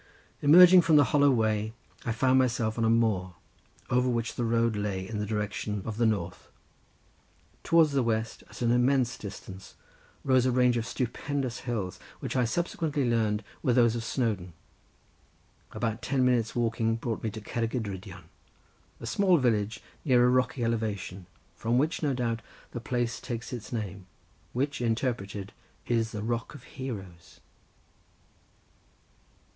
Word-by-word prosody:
Emerging 180 +5 +9
from 165 -2 +3
the 145 - +7
hollow 145 -1 +5
way 110 -3 +1 0.3
I - - +1
found 130 +3 +3
myself 115 -3 +1
on - - +1
a - - +3
moor 105 -6 +1 0.6
over 125 +1 +3
which 115 -1 -1
the 120 - -2
road 115 -1 +1
lay 100 -2 -2
in 105 0 -4
the 105 - -2
direction 105 -1 -3
of 110 -1 -4
the 115 -1 +3
north. 90 -5 -3 1.1
Towards 165 -2 +4
the 140 -1 +2
west 110 -1 -1
at - - -7
an 120 - +3
immense 125 0 +2
distance 95 -2 -9 0.5
rose 130 -2 +3
a - - +2
range 125 0 +3
of 115 0 -2
stupendous 130 +1 -3
hills, 100 -6 -3 0.2
which - - -5
I 125 -2 +3
subsequently 155 0 -1
learned 110 -2 +1 0.2
were 130 -5 +2
those 120 -2 +4
of 115 - -3
Snowdon—about 110 - -6
ten 130 -1 +1
minutes' 120 -3 +1
walking 115 -1 +1
brought 115 -1 -3
me 110 - -1
to 110 - -7
Cerrig 115 +2 -3
y - - +1
Drudion, 95 -4 -7 0.8
a - - -8
small 190 -3 +3
village 110 -5 0 0.2
near 125 -5 +4
a - - +5
rocky 130 0 +1
elevation, 105 -5 -2 0.3
from 115 +2 0
which, 150 +5 +1
no 145 -4 +1
doubt, 115 -2 -1 0.3
the 120 - -5
place 120 -1 -2
takes 120 -1 -5
its 120 -3 -7
name, 100 -5 -5 0.4
which 140 +2 -2
interpreted, 110 -4 -2 0.3
is 115 -2 +1
the 105 -2 -5
Rock 120 +5 -3
of 135 - -12
Heroes. 95 -10 -8
115 Hz, 150 wpm, -28 LUFS, 105-125 Hz, 1.1 s, Emerging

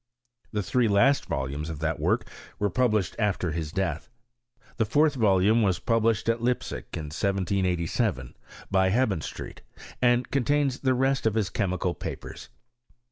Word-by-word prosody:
The 105 -2 -1
three 125 +4 +2
last 110 +8 +3
volumes 70 +4 -3
of 80 - -5
that 80 +1 -2
work - - +1 0.3
were 100 -1 0
published 110 -8 +1
after 95 -5 0
his 80 -1 -4
death. 85 -1 -2 0.7
The 110 - +2
fourth 145 +7 +3
volume 105 -2 +3
was 95 -5 +2
published 115 0 +1
at 115 0 +1
Leipsic, 125 +1 -2
in 75 -2 -6
1787, 90 - -1 0.4
by 95 -1 +3
Hebenstreit, 100 - -2 0.4
and 120 0 +2
contains 140 0 +1
the 130 -2 +1
rest 135 -1 +1
of 110 - 0
his 110 -4 0
chemi 95 -4 -1
cal 90 0 0
papers. - - -7
105 Hz, 145 wpm, -26 LUFS, 90-120 Hz, 0.7 s, last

